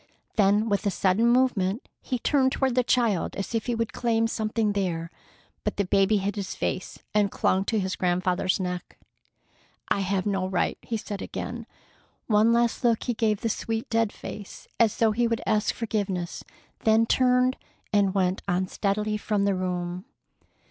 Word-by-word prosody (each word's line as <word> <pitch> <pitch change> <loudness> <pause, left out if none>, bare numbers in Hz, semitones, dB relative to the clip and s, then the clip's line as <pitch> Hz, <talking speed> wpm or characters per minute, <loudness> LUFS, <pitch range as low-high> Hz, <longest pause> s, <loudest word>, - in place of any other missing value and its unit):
Then 210 +1 +3
with 200 -2 0
a - - +4
sudden 195 +4 +2
movement 240 -4 +2
he 255 - -2
turned 260 +2 +2
toward 265 -2 +1
the 250 - +3
child 230 -7 +1
as 195 +3 -4
if 225 0 -1
he 240 - 0
would 230 -1 -2
claim 225 -2 +1
something 220 -1 0
there, 170 -4 -2 0.5
but - - -2
the 200 - +1
baby 195 +3 +3
hid 200 +1 -2
his 195 -2 -4
face 185 - -3 0.2
and 210 -1 +3
clung 190 -1 +1
to 225 - 0
his 190 -2 -1
grandfather's 180 +1 +1
neck. 180 -1 -4 0.9
"I - - +2
have 195 -1 0
no 195 -2 0
right," 190 -1 -1
he 230 - -3
said 210 -2 -6
again. - - -5 0.6
One 215 +1 +4
last 235 +1 +1
look 235 -2 +2
he 245 - -1
gave 215 -3 0
the 230 - 0
sweet 225 +1 -3
dead 225 -2 +2
face, 205 -2 -9
as 225 -3 +3
though 225 -1 +3
he 235 +2 +1
would 230 -1 -1
ask 215 -1 +2
forgiveness, 200 -6 -3 0.4
then 220 +1 +4
turned 250 +1 +3 0.4
and 200 -2 +3
went 185 -1 +1
unsteadily 200 +3 0
from 205 -1 0
the 200 - +2
room. 180 0 -3
210 Hz, 170 wpm, -26 LUFS, 190-230 Hz, 0.9 s, a